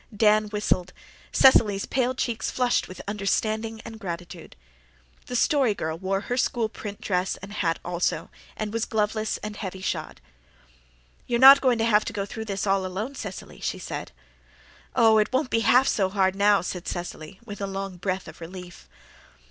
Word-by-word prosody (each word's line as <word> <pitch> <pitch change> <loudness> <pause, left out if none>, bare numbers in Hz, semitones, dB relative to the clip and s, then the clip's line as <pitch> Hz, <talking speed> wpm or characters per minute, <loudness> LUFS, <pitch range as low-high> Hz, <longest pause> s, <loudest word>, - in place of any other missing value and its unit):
Dan 215 0 +4
whistled. 205 -4 -1 0.4
Cecily's 210 -7 +5
pale 255 0 0
cheeks 235 -2 -2
flushed 250 -1 +1
with 185 - -9
understanding 215 +2 -1
and 225 -1 -9
gratitude. 175 -2 -7 0.7
The 245 - -4
Story 260 -4 +3
Girl 160 -3 -3
wore 190 +3 -2
her 245 +3 -3
school 235 -3 0
print 205 -2 -8
dress 185 -1 -1
and 200 +2 -10
hat 165 -5 0
also, 175 0 -1 0.3
and 215 0 -4
was 230 0 0
gloveless 215 0 -1
and 210 0 -5
heavy 190 -2 -5
shod. 190 - -4 1.1
"You're 235 -1 0
not 270 +2 +10
going 255 -3 +3
to 225 - +1
have 215 -2 +4
to 230 - -4
go 200 -1 -2
through 220 +2 -6
this 200 -2 -3
all 195 -1 +2
alone, 195 +8 -4
Cecily," 200 -8 -8
she - - -2
said. - - -6 0.8
"Oh, 220 -1 +6
it 210 - +1
won't 260 0 0
be 230 - +3
half 250 +3 +4
so 190 -3 +1
hard 190 -1 +1
now," 200 -1 +4
said 180 0 -5
Cecily, 175 0 -6
with 205 -3 -8
a 200 - -1
long 195 -1 -5
breath 185 +1 -3
of 160 +1 -12
relief. 175 0 -10
205 Hz, 175 wpm, -25 LUFS, 190-225 Hz, 1.1 s, not